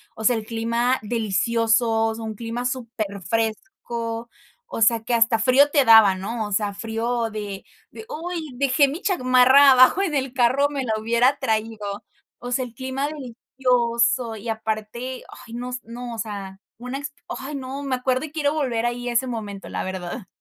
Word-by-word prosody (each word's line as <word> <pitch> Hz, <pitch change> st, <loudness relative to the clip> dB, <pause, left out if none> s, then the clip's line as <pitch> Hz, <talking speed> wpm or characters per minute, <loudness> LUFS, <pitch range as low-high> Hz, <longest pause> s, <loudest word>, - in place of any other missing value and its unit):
O 220 Hz, -, -7 dB
sea, 245 Hz, +1 st, +4 dB
el 220 Hz, -2 st, -4 dB
clima 235 Hz, +3 st, 0 dB
delicioso, 225 Hz, +1 st, +1 dB
o 220 Hz, -, -2 dB
sea 225 Hz, -, -7 dB
un 220 Hz, -1 st, -5 dB
clima 235 Hz, +3 st, -4 dB
súper 235 Hz, -4 st, -3 dB
fresco, 230 Hz, -, -3 dB, 0.4 s
o 225 Hz, -, -5 dB
sea, 225 Hz, +1 st, +4 dB
que 245 Hz, -, -2 dB
hasta 230 Hz, -1 st, +3 dB
frío 265 Hz, +5 st, +5 dB
te 280 Hz, -3 st, +4 dB
daba, 220 Hz, -4 st, +8 dB
¿no? 215 Hz, +3 st, -4 dB
O 205 Hz, -, -9 dB
sea, 205 Hz, 0 st, 0 dB
frío 230 Hz, +2 st, -2 dB
de 205 Hz, -2 st, -6 dB, 0.3 s
de: 440 Hz, -, -10 dB
"Uy, 330 Hz, -, -5 dB
dejé 275 Hz, +2 st, +3 dB
mi 315 Hz, +8 st, -5 dB
chamarra, 260 Hz, -4 st, +6 dB
abajo 255 Hz, +9 st, +6 dB
en 330 Hz, -7 st, -1 dB
el 265 Hz, -2 st, -1 dB
carro. 260 Hz, +3 st, +3 dB
Me 280 Hz, -2 st, -3 dB
la 220 Hz, -, 0 dB
hubiera 235 Hz, +5 st, +2 dB
traído". 215 Hz, -3 st, -2 dB, 0.4 s
O 245 Hz, +1 st, -7 dB
sea, 255 Hz, 0 st, 0 dB
el 235 Hz, -, -12 dB
clima 260 Hz, +3 st, -3 dB
delicioso. 245 Hz, -3 st, 0 dB
Y 220 Hz, +2 st, -7 dB
aparte, 220 Hz, +3 st, -4 dB, 0.2 s
ay 230 Hz, -, -11 dB
no 245 Hz, +1 st, -5 dB
s 250 Hz, 0 st, -4 dB
no, 240 Hz, +1 st, -7 dB
o -, -, -7 dB
sea, 200 Hz, -3 st, -6 dB, 0.2 s
una 250 Hz, +3 st, -5 dB
exp 285 Hz, 0 st, -7 dB, 0.2 s
Ay, 280 Hz, +2 st, -6 dB
no. 270 Hz, +1 st, -5 dB
Me 270 Hz, -2 st, -1 dB
acuerdo, 255 Hz, +2 st, 0 dB
y 300 Hz, -, -10 dB
quiero 295 Hz, -2 st, 0 dB
volver 250 Hz, -7 st, -1 dB
ahí, 245 Hz, 0 st, -2 dB
a -, -, -2 dB
ese 240 Hz, +3 st, +2 dB
momento, 210 Hz, -5 st, -6 dB
la -, -, -3 dB
verdad. 190 Hz, +3 st, -5 dB
235 Hz, 190 wpm, -23 LUFS, 225-260 Hz, 0.4 s, daba